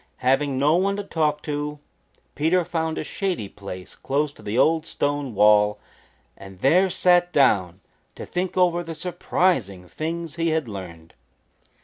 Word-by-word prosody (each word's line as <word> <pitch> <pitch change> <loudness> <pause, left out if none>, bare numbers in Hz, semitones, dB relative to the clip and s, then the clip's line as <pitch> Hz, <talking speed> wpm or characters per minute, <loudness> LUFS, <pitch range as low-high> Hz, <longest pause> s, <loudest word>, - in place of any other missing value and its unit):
Having 135 +1 +2
no 150 +5 +3
one 195 +2 +1
to 205 - -4
talk 155 -5 -1
to, 150 0 -3 0.6
Peter 165 +4 +1
found 160 -1 -2
a - - -2
shady 180 - -3
place 95 -2 -9
close 145 +2 -1
to - - -17
the 105 +3 -3
old 160 +3 +3
stone 145 -4 -2
wall 105 0 +5 0.6
and 95 -1 -12
there 180 +8 +4
sat 175 0 +3
down 95 - +2 0.3
to - - -7
think 180 +1 -3
over 175 -1 +3
the 165 -1 -7
surprising 155 - -1
things 165 - -5
he 165 0 +1
had 160 -4 0
learned. 85 -6 -9
150 Hz, 150 wpm, -23 LUFS, 105-170 Hz, 0.6 s, wall